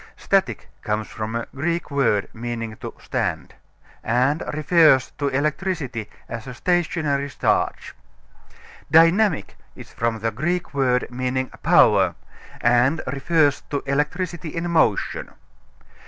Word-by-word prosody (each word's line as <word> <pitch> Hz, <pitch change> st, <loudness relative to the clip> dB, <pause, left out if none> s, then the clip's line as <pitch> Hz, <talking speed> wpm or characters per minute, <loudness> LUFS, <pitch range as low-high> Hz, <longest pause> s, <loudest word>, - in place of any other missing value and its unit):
Static -, -, 0 dB
comes 105 Hz, 0 st, -2 dB
from 110 Hz, 0 st, -5 dB
a 115 Hz, -, -2 dB
Greek 165 Hz, +3 st, -2 dB
word, 130 Hz, -8 st, +1 dB
meaning 115 Hz, -1 st, -5 dB
to -, -, -7 dB
stand, -, -, -3 dB, 0.5 s
and 130 Hz, +6 st, +1 dB
refers 155 Hz, -3 st, +4 dB
to 145 Hz, -, 0 dB
electricity 140 Hz, -, -2 dB, 0.2 s
as 115 Hz, +2 st, -7 dB
a 125 Hz, -, -7 dB
stationary 155 Hz, -3 st, 0 dB
charge. -, -, -1 dB, 1.0 s
Dynamic 165 Hz, +4 st, +4 dB, 0.2 s
is -, -, -12 dB
from 115 Hz, -1 st, -1 dB
the 115 Hz, +1 st, -2 dB
Greek 170 Hz, +11 st, -2 dB
word 125 Hz, -3 st, +1 dB
meaning 130 Hz, +1 st, -2 dB
power, -, -, +4 dB, 0.5 s
and 120 Hz, +6 st, +3 dB
refers 145 Hz, +2 st, +1 dB
to 140 Hz, -, -2 dB
electricity 160 Hz, +4 st, -2 dB
in 170 Hz, +2 st, -3 dB
motion. 165 Hz, -, +1 dB
140 Hz, 115 wpm, -22 LUFS, 120-160 Hz, 1.0 s, refers